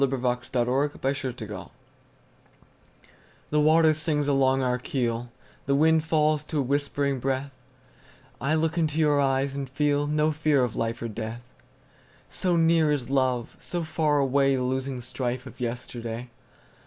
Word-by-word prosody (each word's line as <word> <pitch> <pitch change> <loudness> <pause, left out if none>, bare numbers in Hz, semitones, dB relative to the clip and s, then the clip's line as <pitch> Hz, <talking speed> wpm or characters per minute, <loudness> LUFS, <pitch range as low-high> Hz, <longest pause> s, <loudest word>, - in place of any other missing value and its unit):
By 140 - +5
SophieJewett 125 +2 0
1502 130 -5 -3
Armistice 95 -1 -8 1.8
THE 150 - +3
WATER 155 +1 +5
sings 150 -2 0
along 135 -1 +3
our 125 0 0
keel, 120 -2 -2 0.4
The 140 - +3
wind 160 +2 +4
falls 155 -2 +2
to 155 - -4
a - - +3
whispering 140 0 0
breath;I 130 +1 -5
look 160 +2 0
into 155 -2 0
your 150 -2 +3
eyes 135 0 +1
and 140 -2 -5
feelNo 150 +2 +1
fear 150 -3 +2
of 125 - -2
life 115 0 -2
or - - -2
death; 115 +2 -6 0.9
So 180 -2 0
near 165 -2 +4
is 135 -3 -2
love, 130 -3 0
so 175 -1 -4
far 155 -2 +1
awayThe 135 -1 +2
losing 130 0 -2
strife 125 0 -3
of 130 - -12
yesterday. 120 -1 -5
135 Hz, 140 wpm, -26 LUFS, 125-150 Hz, 1.8 s, By